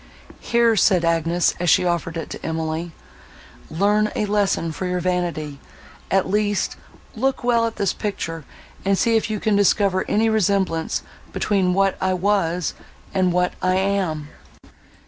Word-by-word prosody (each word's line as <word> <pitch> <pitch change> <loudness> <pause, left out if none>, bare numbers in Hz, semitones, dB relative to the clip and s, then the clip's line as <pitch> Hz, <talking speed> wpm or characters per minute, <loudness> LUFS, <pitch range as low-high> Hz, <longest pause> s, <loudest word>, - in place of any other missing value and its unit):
"Here," 235 -1 +2
said 185 -4 +3
Agnes, 165 +1 +2
as 175 -1 +1
she 180 - +4
offered 170 -1 -1
it 165 - -6
to - - -8
Emily, 160 +1 -3 0.8
"learn 210 +5 +2
a 210 - 0
lesson 200 -5 0
for 180 +4 -4
your 180 0 -1
vanity, 170 -5 -2 0.5
at 195 -1 +2
least; 205 +1 0 0.4
look 265 +3 -1
well 235 -1 +3
at 225 - -6
this 200 - 0
picture, 165 -6 -4 0.4
and 195 0 +2
see 230 +3 +2
if 225 - +1
you 215 -1 -2
can 215 0 +1
discover 200 -1 +3
any 220 +2 +2
resemblance 195 -6 0 0.3
between 185 -3 +1
what 195 0 +2
I 185 0 +1
was, 180 -3 0 0.4
and 185 -1 +2
what 180 0 +1
I 185 0 +2
am." 185 -6 -1
185 Hz, 150 wpm, -22 LUFS, 170-205 Hz, 0.8 s, she